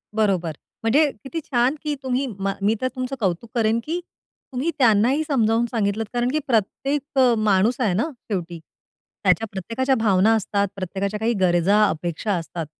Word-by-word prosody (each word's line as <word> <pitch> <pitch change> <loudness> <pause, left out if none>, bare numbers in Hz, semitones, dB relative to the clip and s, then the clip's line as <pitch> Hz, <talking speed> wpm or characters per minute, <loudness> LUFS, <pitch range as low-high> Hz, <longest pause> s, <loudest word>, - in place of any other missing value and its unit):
बरोबर 190 -6 +1 0.3
म्हणजे 280 +8 +4 0.2
किती 325 +5 -4
छान 250 +2 +1
की 300 -1 -1
तुम्ही 260 +1 0
म 195 0 -1
मी 210 +3 +2
तर 255 - +1
तुमचं 255 +1 -3
कौतुक 195 +2 -1
करेन 225 0 +2
की 335 +3 -2 0.5
तुम्ही 270 +7 -1
त्यांनाही 245 +4 +4
समजावून 230 -4 +2
सांगितलत 220 -1 0
कारण 245 +1 +1
की 310 - +1
प्रत्येक 265 +5 0 0.2
अ, 250 -2 +5
माणूस 215 +4 +2
आहे 210 -7 +1
ना 260 - 0 0.2
शेवटी. 175 -3 -3 0.6
त्याच्या 225 0 +3
प्रत्येकाच्या 235 +8 -1
भावना 215 0 +3
असतात, 200 -1 0
प्रत्येकाच्या 195 +2 -3
काही 230 +2 +1
गरजा, 185 +4 +3
अपेक्षा 175 +5 -2
असतात. 165 -1 -4
220 Hz, 160 wpm, -23 LUFS, 195-255 Hz, 0.6 s, अ